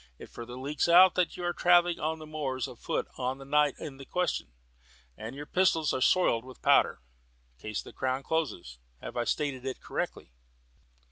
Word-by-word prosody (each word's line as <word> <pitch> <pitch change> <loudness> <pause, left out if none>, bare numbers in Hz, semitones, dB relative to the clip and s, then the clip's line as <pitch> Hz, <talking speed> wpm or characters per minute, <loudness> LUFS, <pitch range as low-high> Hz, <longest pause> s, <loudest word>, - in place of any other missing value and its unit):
It - - -11
further 120 +1 -8
leaks 145 +5 -1
out 180 +2 +8
that 180 -2 0
you 180 - -6
were 175 0 0
travelling 175 -1 +4
on 160 +1 -1
the 155 - -10
moors 140 -5 -3
afoot - - -3
on 130 +1 -1
the 135 - -11
night 145 0 +3
in 135 -3 -8
question, 180 - -2 0.6
and 110 - -7
that - - -10
your 145 - -6
pistols 165 -3 +2
are 130 - -2
soiled 125 -8 +3
with 130 -1 -13
powder. - - +4 0.6
Case 105 -1 -4
for - - -11
the - - -14
Crown 130 +1 -2
closes. 110 - -3 0.2
Have - - -8
I 120 -1 0
stated 140 -3 -1
it 130 -1 -4
correctly?" - - -4
145 Hz, 190 wpm, -29 LUFS, 130-165 Hz, 0.6 s, out